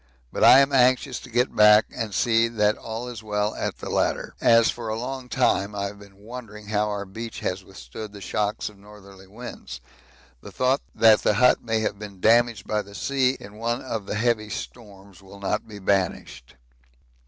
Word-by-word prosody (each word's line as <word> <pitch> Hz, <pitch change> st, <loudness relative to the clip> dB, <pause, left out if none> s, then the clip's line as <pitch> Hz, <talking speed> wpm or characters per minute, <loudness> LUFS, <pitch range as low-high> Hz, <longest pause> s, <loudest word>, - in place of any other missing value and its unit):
But -, -, -2 dB
I 135 Hz, -, +9 dB
am 140 Hz, 0 st, +1 dB
anxious 130 Hz, -1 st, +3 dB
to 130 Hz, -, -13 dB
get 125 Hz, +2 st, 0 dB
back 105 Hz, 0 st, +7 dB
and 115 Hz, -4 st, -3 dB
see 115 Hz, +4 st, +2 dB
that 105 Hz, -2 st, +1 dB
all 115 Hz, +2 st, -6 dB
is 120 Hz, -3 st, -7 dB
well 105 Hz, -1 st, -1 dB
at -, -, -4 dB
the -, -, -8 dB
latter, -, -, -1 dB
as 115 Hz, -1 st, +5 dB
for 115 Hz, -2 st, -7 dB
a 110 Hz, -, -2 dB
long 130 Hz, +1 st, -5 dB
time 105 Hz, -2 st, +1 dB
I 100 Hz, -1 st, -2 dB
have 100 Hz, +1 st, -7 dB
been 100 Hz, -1 st, -16 dB
wondering 105 Hz, -1 st, -10 dB
how 105 Hz, 0 st, 0 dB
our 100 Hz, -1 st, -4 dB
beach 115 Hz, +4 st, -8 dB
has 95 Hz, +1 st, -3 dB
withstood 95 Hz, -, -10 dB
the 100 Hz, -, -11 dB
shocks 105 Hz, +2 st, -2 dB
of 105 Hz, -2 st, -11 dB
northerly 100 Hz, -2 st, -15 dB
winds. 105 Hz, -, -9 dB, 0.6 s
The -, -, -11 dB
thought 130 Hz, +2 st, +1 dB
that 110 Hz, -2 st, +6 dB
the 105 Hz, -, +2 dB
hut 125 Hz, +5 st, +4 dB
may 110 Hz, -1 st, 0 dB
have 105 Hz, -2 st, -2 dB
been 100 Hz, -3 st, -9 dB
damaged 115 Hz, 0 st, +3 dB
by 105 Hz, -1 st, -1 dB
the 100 Hz, 0 st, -13 dB
sea 135 Hz, 0 st, 0 dB
in 100 Hz, +1 st, -12 dB
one 120 Hz, +2 st, -2 dB
of 115 Hz, -6 st, -5 dB
the -, -, -3 dB
heavy 110 Hz, -1 st, 0 dB
storms 100 Hz, -5 st, -9 dB
will 100 Hz, +1 st, -14 dB
not 100 Hz, +2 st, -2 dB
be 105 Hz, -2 st, -10 dB
banished. 95 Hz, -10 st, -2 dB
105 Hz, 200 wpm, -24 LUFS, 100-120 Hz, 0.6 s, I